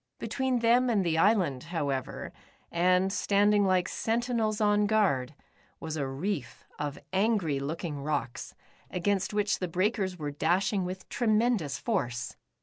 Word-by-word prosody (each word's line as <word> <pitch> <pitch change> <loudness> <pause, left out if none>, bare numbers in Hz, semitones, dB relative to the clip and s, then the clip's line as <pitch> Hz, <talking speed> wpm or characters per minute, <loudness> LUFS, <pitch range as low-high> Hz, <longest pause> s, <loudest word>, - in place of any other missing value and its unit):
Between 260 -3 -1
them 245 +2 +4
and 205 -5 +2
the 160 -1 +1
island, 180 - +2
however, 145 -6 -3 0.4
and 180 +2 +2
standing 205 0 +3
like 185 -1 +2
sentinels 230 -2 -1
on 210 -1 +3
guard, 155 -11 +1 0.4
was 160 -1 -5
a 140 -3 -2
reef 150 +6 -4
of 145 -1 -3 0.2
angry 190 -8 +1
looking 150 +1 -4
rocks, 145 -4 -3 0.3
against 190 +1 0
which 210 0 0
the 180 - -2
breakers 190 +1 0
were 150 -3 -4
dashing 185 +6 +1
with 185 +1 -6
tremendous 215 - +1
force. 125 - -2
185 Hz, 135 wpm, -29 LUFS, 155-210 Hz, 0.4 s, them